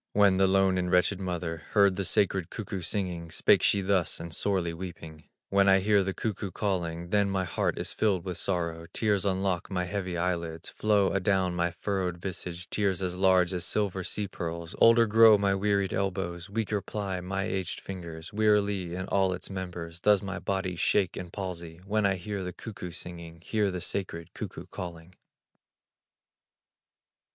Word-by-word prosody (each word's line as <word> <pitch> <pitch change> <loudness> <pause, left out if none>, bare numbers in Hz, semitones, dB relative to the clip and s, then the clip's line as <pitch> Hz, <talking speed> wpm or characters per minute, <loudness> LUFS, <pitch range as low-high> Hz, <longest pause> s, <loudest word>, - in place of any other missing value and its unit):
When 100 -2 +5
the 95 0 +4
lone 95 -1 +3
and 90 -1 -1
wretched 90 +2 +3
mother 85 -3 -3
Heard 100 -2 +5
the 100 - -2
sacred 95 -4 +2
cuckoo 100 -4 -5
singing, 85 -2 -2
Spake - - +4
she 100 - +3
thus, 95 -2 +1
and 85 -1 -6
sorely 90 -3 0
weeping: 80 -3 -8 0.2
"When 100 0 +4
I 95 - +7
hear 100 +1 +3
the 95 - -1
cuckoo 100 0 -3
calling, 85 -3 -2
Then 100 -1 +3
my 95 -1 0
heart 90 - -1
is - - -3
filled 95 -5 +1
with 90 -2 -3
sorrow; 85 -3 -2
Tears 105 -3 +1
unlock 95 -2 0
my 90 -2 -1
heavy 90 -1 -3
eyelids, 85 -2 -2
Flow 105 -2 +2
adown 95 -2 +1
my 85 0 +1
furrowed 90 0 -2
visage, 90 -1 -6
Tears 95 -3 0
as 90 -1 -2
large 95 -1 +4
as 90 -1 -1
silver 95 0 0
sea 105 +3 -2
pearls; 85 -2 -5
Older 115 0 +7
grow 110 0 +7
my 100 -1 +2
wearied 100 0 +1
elbows, 95 -2 -2
Weaker 105 -1 -1
ply 95 -4 -4
my 95 +2 -2
aged 95 -1 -2
fingers, 85 -3 -8
Wearily, 105 -4 +2
in 95 +1 -3
all 95 -1 +2
its 90 - -6
members, 90 -3 -6
Does 105 +1 +4
my 95 -2 -4
body 95 -2 -2
shake 95 +2 +2
in 90 - -6
palsy, 85 -3 -6
When 105 0 +2
I 95 - +1
hear 95 +2 -4
the 90 0 -5
cuckoo 100 -4 -7
singing, 85 -1 -8
Hear 105 +2 0
the 90 -1 -4
sacred 85 -4 -3
cuckoo - - -7
calling." 85 0 -7
95 Hz, 175 wpm, -28 LUFS, 85-100 Hz, 0.2 s, I